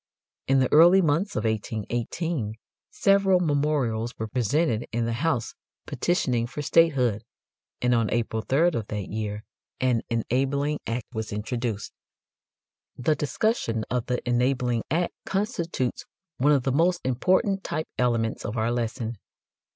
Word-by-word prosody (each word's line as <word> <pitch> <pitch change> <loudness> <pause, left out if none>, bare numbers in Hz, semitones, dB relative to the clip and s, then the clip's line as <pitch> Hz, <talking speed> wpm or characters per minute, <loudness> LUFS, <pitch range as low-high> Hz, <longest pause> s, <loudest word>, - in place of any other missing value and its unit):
In 135 - +4
the 130 -1 +2
early 170 +5 +8
months 170 +4 +1
of 105 - -1
1818 110 - -2 0.3
several 195 -2 +3
memorials 140 -8 0
were 110 - -3
presented 120 +2 0
in 115 0 0
the 115 - -1
House 130 -1 -1 0.3
petitioning 125 -9 0
for 145 +4 -6
statehood, 130 -10 +3 0.6
and 125 0 +3
on 115 -3 +2
April 115 -1 -1
3 145 +9 +3
of 115 -10 -3
that 105 -3 -4
year 105 0 -4 0.4
an 125 -3 +2
enabling 135 +5 0
act 115 0 -2
was 110 -1 -4
introduced. 110 +1 -3 1.0
The 155 +5 +2
discussion 140 - -1
of 125 -2 -1
the 125 0 -2
enabling 125 -1 +1
act 170 +4 0
constitutes 170 - -2 0.3
one 145 +4 +4
of 140 -4 +3
the 135 - 0
most 170 +5 +2
important 185 - +1
"type 155 -2 -3
elements" 115 -3 0
of 110 - -4
our 110 +2 +1
lesson. 115 -2 -3
125 Hz, 135 wpm, -26 LUFS, 115-155 Hz, 1.0 s, early